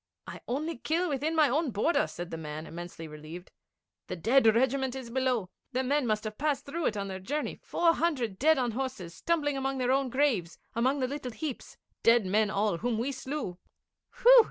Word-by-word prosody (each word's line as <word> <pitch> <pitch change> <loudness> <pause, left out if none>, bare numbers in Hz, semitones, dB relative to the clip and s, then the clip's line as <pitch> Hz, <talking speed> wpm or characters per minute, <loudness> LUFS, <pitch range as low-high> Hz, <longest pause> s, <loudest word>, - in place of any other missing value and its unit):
'I - - -8
only 300 +5 -2
kill 335 +6 0
within 295 +3 -1
my 310 -2 +5
own 295 +3 +1
border,' 240 +10 +2
said 175 0 -7
the 165 - -4
man, 155 0 -6
immensely 170 0 -8
relieved. 155 +4 -10 0.6
'The - - -4
Dead 225 +8 +4
Regiment 260 +3 +2
is 255 -3 -7
below. 250 -7 0 0.2
The 260 +1 +1
men 280 0 +1
must 215 -1 0
have 215 -1 -6
passed 295 -1 0
through 320 +4 -1
it 215 - -1
on 200 -1 -2
their 190 -1 -5
journey 290 +11 -3
four 335 -1 +2
hundred 260 - -1
dead 315 +3 +5
on 245 -2 +1
horses, 240 -8 -4
stumbling 290 - 0
among 270 0 -1
their 250 -1 +1
own 270 0 +2
graves, 235 - +1 0.2
among 260 +4 +1
the 255 - +1
little 265 -2 -5
heaps 270 +3 -6 0.2
dead 230 -2 +5
men 210 +3 +2
all, 205 -4 0
whom 240 -1 0
we 245 +5 -1
slew.' 260 -9 -5 0.6
'Whew!' - - +10
255 Hz, 200 wpm, -29 LUFS, 205-285 Hz, 0.6 s, Whew